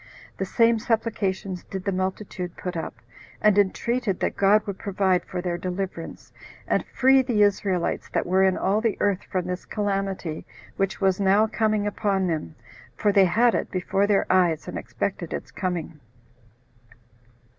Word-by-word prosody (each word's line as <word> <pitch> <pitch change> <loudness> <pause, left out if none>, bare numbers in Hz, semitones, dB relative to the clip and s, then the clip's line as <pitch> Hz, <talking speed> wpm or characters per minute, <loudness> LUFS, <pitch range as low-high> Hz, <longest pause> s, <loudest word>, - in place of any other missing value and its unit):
The - - -1
same 230 -1 +3
supplications 200 -5 -1
did 190 -1 -6
the 200 - +1
multitude 185 -1 -4
put 180 -1 -5
up, 165 - -4 0.4
and 210 -2 +4
entreated 205 +1 +1
that - - -1
God 205 +2 +4
would 200 -2 -5
provide 190 -3 +1
for 180 - -5
their 175 -1 -2
deliverance, 180 -2 -5 0.3
and - - +1
free 265 +1 +4
the 240 -5 +2
Israelites 195 -3 0
that - - -1
were 185 +2 +3
in 190 -1 +3
all 205 +3 +1
the 225 -3 0
earth 200 -2 +1
from 185 -2 -1
this 180 0 -4
calamity 195 -5 -2 0.3
which 195 0 -1
was 190 -1 +2
now 200 +2 +4
coming 215 -1 0
upon 200 -2 0
them, 155 - -3 0.4
for 205 - +2
they 195 -1 +6
had 230 +7 +3
it - - -1
before 195 +2 0
their 205 -1 +3
eyes, 175 -4 +2
and - - -6
expected - - -4
its - - -6
coming. 175 -4 -4
195 Hz, 160 wpm, -25 LUFS, 185-210 Hz, 0.4 s, they